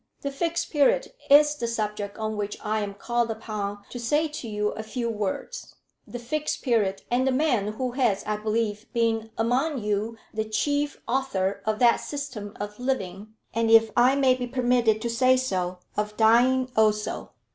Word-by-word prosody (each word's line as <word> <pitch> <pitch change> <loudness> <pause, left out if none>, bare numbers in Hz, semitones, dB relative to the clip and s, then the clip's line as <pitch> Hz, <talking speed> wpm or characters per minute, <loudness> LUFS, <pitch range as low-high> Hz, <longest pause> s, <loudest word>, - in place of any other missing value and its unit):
The 280 - -3
Fixed 335 +4 -2
Period 290 - +3 0.2
is 295 +1 +7
the 240 -6 -3
subject 210 -3 -3
on 220 0 -3
which 205 0 -3
I 215 +1 0
am 200 -1 -4
called 235 +2 -1
upon 210 -2 -4
to 245 - -6
say 295 +7 +1
to 300 -5 -7
you 210 -1 -1
a 215 - -5
few 230 +2 -3
words; 210 - -4 0.3
the 245 - -6
Fixed 295 +6 -3
Period, 210 -7 +1
and 255 +2 +2
the - - +3
man 250 -7 +1
who 250 +3 -2
has, 240 -6 +1
I 215 0 -1
believe, 215 0 -2
been 225 -1 0
among 255 +7 +1
you 210 +2 -1 0.2
the 220 0 -1
chief 285 +6 -1
author 200 -7 -1
of 215 0 +1
that 235 0 +5
system 255 -8 -6
of 210 +1 -6
living, 215 -5 -3 0.2
and 230 0 +1
if 225 -1 +6
I 250 +3 +5
may 270 -2 +4
be 250 -1 -3
permitted 245 -3 +2
to 235 - -1
say 255 +2 +4
so, 185 -8 -2 0.2
of 210 0 -2
dying 250 +3 +4
also." 215 -1 +1
230 Hz, 180 wpm, -26 LUFS, 210-255 Hz, 0.3 s, is